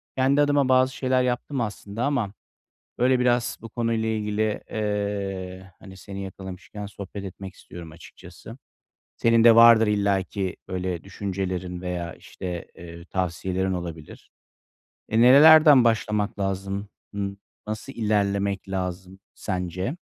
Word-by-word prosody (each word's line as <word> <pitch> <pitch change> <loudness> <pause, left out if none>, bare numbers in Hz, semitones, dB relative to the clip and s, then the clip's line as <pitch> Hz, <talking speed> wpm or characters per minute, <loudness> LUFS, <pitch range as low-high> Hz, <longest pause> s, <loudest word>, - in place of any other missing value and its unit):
Kendi 135 +2 +3
adıma 145 -2 +2
bazı 130 0 +4
şeyler 130 -1 +1
yaptım 125 +2 -2
aslında 105 0 -4
ama, 125 -9 -1 0.6
böyle, 125 +1 +3
biraz 125 -1 +1
bu 115 - -9
konuyla 115 -1 -1
ilgili, 105 0 -1
eee, 100 -3 -3
hani, 95 -1 -13
seni 100 +1 -7
yakalamışken 95 +2 -8
sohbet 100 0 -8
etmek 95 0 -8
istiyorum 85 -2 -11
açıkçası. 80 +1 -13 0.6
Senin 115 -1 +3
de 115 -1 +8
vardır 115 -1 +8
illaki 100 -2 0
böyle 90 -2 -3
düşüncelerin 95 -2 -4
veya, 90 -2 -4
işte, 90 -2 -7
eee, 85 0 -11
tavsiyelerin 95 +1 -2
olabilir. 85 -4 -8 0.8
E, 110 - +2
nerelerden 145 +2 +8
başlamak 105 -3 0
lazım? 100 +1 -3 0.2
Imm, 100 -1 -4 0.3
nasıl 110 +5 -5
ilerlemek 100 -4 0
lazım 95 0 -4 0.2
sence? 95 - -3
100 Hz, 120 wpm, -24 LUFS, 95-115 Hz, 0.8 s, de